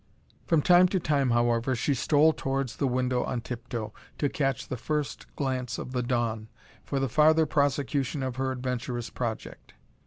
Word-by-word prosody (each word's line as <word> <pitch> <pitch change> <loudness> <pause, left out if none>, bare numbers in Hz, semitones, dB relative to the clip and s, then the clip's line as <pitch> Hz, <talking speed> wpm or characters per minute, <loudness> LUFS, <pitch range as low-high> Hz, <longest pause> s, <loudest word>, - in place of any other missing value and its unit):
From 160 -4 +3
time 180 +1 +6
to 190 +1 0
time, 145 -5 +1
however, 120 +1 +2
she 140 +5 0
stole 150 +4 +4
towards 135 -4 -2
the 140 - +1
window 125 0 0
on 125 -2 -3
tiptoe, 115 -3 -5 0.2
to 145 - +1
catch 135 -5 -1
the - - -3
first 150 +4 -3
glance 130 -3 -2
of - - -6
the 125 -1 -1
dawn, 115 -3 -1 0.4
for 140 - -2
the 135 - +1
farther 155 +5 +4
prosecution 140 -1 0
of 130 -1 -3
her 130 0 0
adventurous 125 -2 -3
project. 115 -3 -5
130 Hz, 165 wpm, -28 LUFS, 120-145 Hz, 0.4 s, time